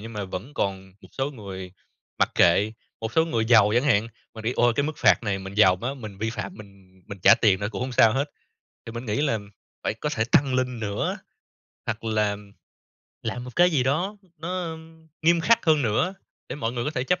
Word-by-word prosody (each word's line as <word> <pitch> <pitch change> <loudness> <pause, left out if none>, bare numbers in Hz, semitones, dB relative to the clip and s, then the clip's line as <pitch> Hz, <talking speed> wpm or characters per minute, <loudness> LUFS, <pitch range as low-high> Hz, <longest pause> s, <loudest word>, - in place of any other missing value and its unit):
nhưng 115 +2 -8
mà 105 -2 -4
vẫn 95 +9 -7
còn 95 -1 -3
một - - -15
số 135 +1 -2
người 95 -7 -8 0.5
mặc - - +3
kệ. 100 +5 +4 0.3
Một 110 +1 -4
số 160 - +4
người 115 -9 0
giàu 110 -3 +6
chẳng 120 - +4
hạn 115 -5 +3 0.3
mà 110 - -8
đi 115 +3 0
"Ôi, 120 -1 +4
cái 145 - +2
mức 155 - -2
phạt - - +4
này 100 -3 -1
mình 95 0 -8
giàu 95 -3 +5
quá, 120 +8 -4
mình 110 -7 -9
vi 110 +2 -1
phạm 115 - -5
mình 95 -3 -16
mình 100 -2 -8
trả - - +8
tiền 100 -4 +3
nữa 105 - -1
cũng 95 - -4
hông 130 +1 -3
sao 115 -2 +5
hết", 140 +3 -1 0.6
thì 115 - -7
mình 120 +1 -6
nghĩ 105 +3 0
là 125 -7 +1 0.5
phải - - 0
có 150 +7 -3
thể 110 - +1
tăng 140 -5 +4
lên 125 -2 -1
nữa, 105 -2 -2 0.7
hoặc 110 +1 -3
là 105 -2 0 0.9
làm 120 +2 -4
một 125 - -10
cái 175 +1 +6
gì 145 -6 +2
đó 170 +11 0 0.2
nó, 180 +3 -3
ưm, 160 0 -10
nghiêm 170 +1 +4
khắc 230 +7 +3
hơn 155 -2 +4
nữa 125 - +1 0.3
để - - -5
mọi 115 -4 -2
người 120 -1 -3
có - - -1
thể 130 -4 -2
chấp 180 +6 +1
115 Hz, 230 wpm, -25 LUFS, 105-145 Hz, 0.9 s, trả